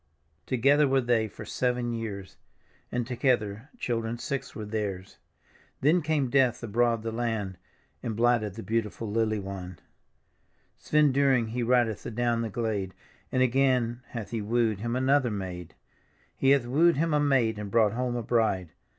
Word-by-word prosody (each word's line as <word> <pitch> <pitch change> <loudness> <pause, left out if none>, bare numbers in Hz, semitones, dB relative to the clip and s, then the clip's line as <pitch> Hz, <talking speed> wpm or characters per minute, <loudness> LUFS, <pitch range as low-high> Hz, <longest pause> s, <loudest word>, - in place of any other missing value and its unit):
Together 140 +4 +4
were 135 0 +3
they 120 -3 +1
for 105 - -10
seven 125 -1 -1
years. 105 -4 -6 0.6
And 125 -1 -1
together 120 -2 0
children 115 - -2
six 135 +1 -4
were 110 - -5
theirs; 100 -3 -4 0.6
Then 160 +6 +4
came 145 -5 0
Death 130 -4 +2
abroad 115 0 +1
through 115 - -3
the 110 - -6
land. 110 -6 -2 0.4
And 110 - -3
blighted 115 -3 +2
the 115 - -7
beautiful 110 -1 -2
lily 110 0 +1
wand. 95 -2 -7 1.0
Svend 150 -3 +3
Dyring 130 -4 +3
he 120 +2 -3
ndcth 120 -3 +2
adown 120 0 0
the 115 - -2
glade. 105 -4 -2 0.4
And 130 0 +3
again 125 -2 +2
hath 115 -4 -7
he 115 -2 -2
wooed 110 -1 +1
him 115 +3 -2
another 130 0 +2
maid. 90 -5 -6 0.6
He 135 - +2
hath 140 -3 +4
wooed 160 +8 +4
him 165 +1 +1
a 150 - +3
maid 125 -7 +2
and 105 -1 -5
brought 110 -1 +3
home 125 0 -1
a 120 - -2
bride. 110 -7 +1
115 Hz, 160 wpm, -28 LUFS, 110-130 Hz, 1.0 s, Together